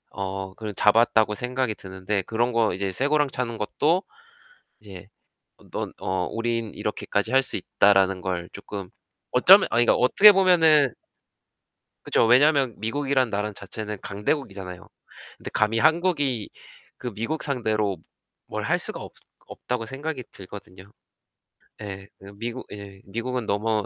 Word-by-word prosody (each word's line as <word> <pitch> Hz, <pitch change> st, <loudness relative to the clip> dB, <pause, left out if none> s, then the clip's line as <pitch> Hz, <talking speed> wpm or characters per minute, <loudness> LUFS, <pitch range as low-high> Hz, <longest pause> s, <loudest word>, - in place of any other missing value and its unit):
어 95 Hz, 0 st, -5 dB
그 110 Hz, -2 st, -6 dB
잡았다고 110 Hz, 0 st, +3 dB
생각이 125 Hz, 0 st, -2 dB
드는데 95 Hz, +1 st, -4 dB
그런 120 Hz, +5 st, -1 dB
거 115 Hz, -1 st, +2 dB
이제 95 Hz, 0 st, -3 dB
쇠고랑 145 Hz, +7 st, +1 dB
차는 115 Hz, -3 st, -3 dB
것도 160 Hz, -, +1 dB, 0.8 s
이제 95 Hz, -3 st, -11 dB, 0.7 s
넌 -, -, -4 dB
어 95 Hz, -1 st, -1 dB
'우린 115 Hz, -1 st, -2 dB
이렇게까지 105 Hz, +4 st, -2 dB
할 135 Hz, 0 st, +5 dB
수 -, -, -6 dB
있다.'라는 95 Hz, -2 st, +3 dB
걸 90 Hz, -2 st, -3 dB
쪼끔 100 Hz, -1 st, -8 dB, 0.4 s
어쩌면 185 Hz, +10 st, +7 dB
아니 120 Hz, +1 st, +3 dB
그러니까 -, -, +5 dB
어떻게 200 Hz, +12 st, +7 dB
보면은 160 Hz, -, +4 dB, 1.1 s
그쵸. -, -, +2 dB
왜냐면 135 Hz, -1 st, +4 dB
미국이란 130 Hz, +3 st, 0 dB
나라 105 Hz, +1 st, -2 dB
자체는 105 Hz, +1 st, -7 dB
강대국이잖아요. 100 Hz, -, -4 dB, 0.5 s
근데 -, -, -8 dB
감히 110 Hz, +2 st, +1 dB
한국이 155 Hz, -, +1 dB, 0.5 s
그 125 Hz, -2 st, -6 dB
미국 115 Hz, +10 st, -3 dB
상대로 110 Hz, -, -1 dB, 0.5 s
뭘 -, -, -4 dB
할 -, -, +1 dB
수가 -, -, -7 dB
없 -, -, -9 dB, 0.3 s
없다고 125 Hz, -2 st, -4 dB
생각이 135 Hz, +1 st, -5 dB
들거든요. 95 Hz, 0 st, -12 dB, 0.9 s
예. 95 Hz, -1 st, -7 dB
그 100 Hz, +1 st, -13 dB
미국 120 Hz, +3 st, -5 dB
예. 100 Hz, -1 st, -10 dB
미국은 115 Hz, +4 st, -3 dB
너무 105 Hz, +1 st, 0 dB
110 Hz, 295 characters per minute, -24 LUFS, 100-130 Hz, 1.1 s, 어쩌면